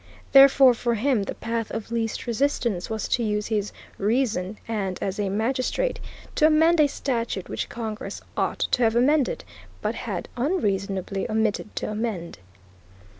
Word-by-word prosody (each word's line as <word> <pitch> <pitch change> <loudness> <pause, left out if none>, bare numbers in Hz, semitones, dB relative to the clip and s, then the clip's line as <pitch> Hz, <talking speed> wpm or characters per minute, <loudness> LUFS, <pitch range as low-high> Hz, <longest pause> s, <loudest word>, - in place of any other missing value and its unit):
Therefore, 270 -1 +8
for 235 0 -1
him 245 0 +1
the - - -5
path 230 -1 -3
of 225 0 -5
least 225 -1 -2
resistance 235 -6 0
was 220 -1 -2
to 240 - +1
use 210 -1 0
his 210 -2 -1 0.3
reason, 210 -3 0
and, 200 -5 -2
as 195 +1 -3
a 200 -2 0
magistrate, 255 - 0 0.3
to 305 - +5
amend 320 +2 +4
a 300 - +6
statute 235 -8 -2
which - - -3
Congress 225 +1 -5 0.2
ought - - 0
to 250 - +2
have 225 -1 +3
amended, 290 - +2 0.4
but - - -1
had - - -4
unreasonably 195 - -1
omitted 215 -1 -1
to - - -3
amend. 210 - -4
230 Hz, 150 wpm, -25 LUFS, 210-260 Hz, 0.4 s, Therefore